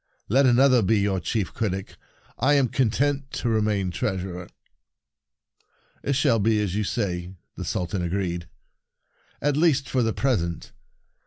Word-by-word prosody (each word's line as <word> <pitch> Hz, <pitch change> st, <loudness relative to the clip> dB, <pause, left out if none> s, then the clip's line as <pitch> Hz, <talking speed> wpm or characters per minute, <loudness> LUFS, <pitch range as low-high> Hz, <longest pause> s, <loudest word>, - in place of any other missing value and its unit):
Let 135 Hz, +5 st, +4 dB
another 130 Hz, 0 st, +5 dB
be 110 Hz, +2 st, +2 dB
your 100 Hz, -1 st, +1 dB
Chief 100 Hz, +2 st, -2 dB
Critic; 95 Hz, -3 st, -3 dB, 0.4 s
I 145 Hz, +4 st, +4 dB
am 135 Hz, -4 st, +3 dB
content 135 Hz, +4 st, 0 dB
to 120 Hz, -, -2 dB
remain 105 Hz, -4 st, +1 dB
Treasurer." 90 Hz, -1 st, -3 dB, 0.8 s
" -, -, -63 dB, 0.7 s
It 140 Hz, -, 0 dB
shall 135 Hz, -4 st, +3 dB
be 110 Hz, +1 st, +2 dB
as 100 Hz, -4 st, -1 dB
you 105 Hz, -, 0 dB
say," 90 Hz, -2 st, -3 dB, 0.2 s
the -, -, -5 dB
Sultan 90 Hz, +1 st, -2 dB
agreed; 90 Hz, -1 st, -2 dB, 0.5 s
" -, -, -38 dB
at 145 Hz, -1 st, +2 dB
least, 145 Hz, -4 st, +2 dB
for 130 Hz, -, 0 dB
the 115 Hz, -1 st, +1 dB
present. 85 Hz, -, -1 dB
110 Hz, 150 wpm, -25 LUFS, 95-130 Hz, 0.8 s, another